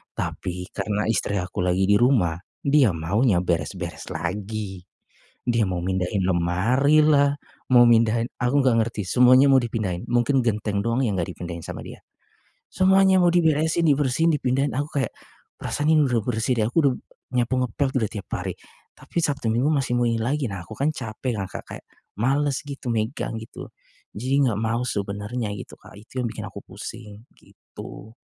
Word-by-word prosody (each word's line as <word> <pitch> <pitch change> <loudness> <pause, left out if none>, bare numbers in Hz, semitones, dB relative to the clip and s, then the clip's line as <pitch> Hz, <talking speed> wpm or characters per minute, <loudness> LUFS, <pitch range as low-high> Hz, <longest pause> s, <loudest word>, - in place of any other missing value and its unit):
Tapi, 90 0 -5
karena 105 +1 -2
istri 100 -2 -1
aku 90 -1 -3
lagi 90 +1 +1
di 100 +1 +4
rumah, 100 - +2 0.2
dia 140 - +4
maunya 90 +3 +1
beres-beres 85 +1 -3
lagi. 95 +3 -4 0.7
Dia 115 -2 +2
mau 90 -2 -2
mindahin 95 +1 -1
lemarilah, 140 - +3 0.3
mau 120 -1 +7
mindahin, 115 0 +3 0.2
aku 125 +3 +1
enggak 120 - +4
ngerti 110 -3 -4
semuanya 130 +5 +6
mau 135 - +6
dipindahin, 105 -7 -3
mungkin 120 +2 +2
genteng 105 -3 -1
doang 115 +3 0
yang 100 - -1
enggak 85 +2 -2
dipindahin 85 -1 -7
sama - - -7
dia. - - -11 0.7
Semuanya 190 0 +4
mau 175 - +5
diberesin, 160 -1 +2
dibersihin, 145 +2 +2
dipindahin, 135 +1 0
aku 145 0 -2
kayak, 120 - -2 0.5
"Perasaan 150 +1 -2
ini 155 -1 +5
udah 120 -3 +1
bersih 120 +1 0
deh," 105 - +2
aku 120 - -5
udah 130 - +2 0.4
nyapu, 125 +1 +1
ngepel 135 +4 -1
udah 110 -4 0
tiap 105 -3 -7
hari. - - -3 0.4
Tapi, - - -10
Sabtu, 140 -6 -1
Minggu 130 +6 +2
masih 135 -4 0
mau 120 - +2
ini 115 - 0
lagi, 135 +4 0
nah, 95 - -5
aku - - -10
kan, 140 +3 +1
capek 115 -1 -4
kan, 95 - -2
Kak, - - -7
kayak, - - -9 0.3
males 140 +3 +1
gitu, 135 -4 -5
megang 115 +3 -2
gitu. 110 - -10 0.4
Jadi, 130 +6 -1
enggak 110 -3 -1
mau 115 +2 0
sebenernya 105 +2 -3
gitu, - - -9
Kak, - - -15
itu 115 +5 -8
yang 120 - -1
bikin 110 -1 -7
aku 100 +1 -9
pusing, 105 +1 -9 0.2
gitu. 110 - -12
115 Hz, 170 wpm, -24 LUFS, 100-135 Hz, 0.7 s, mau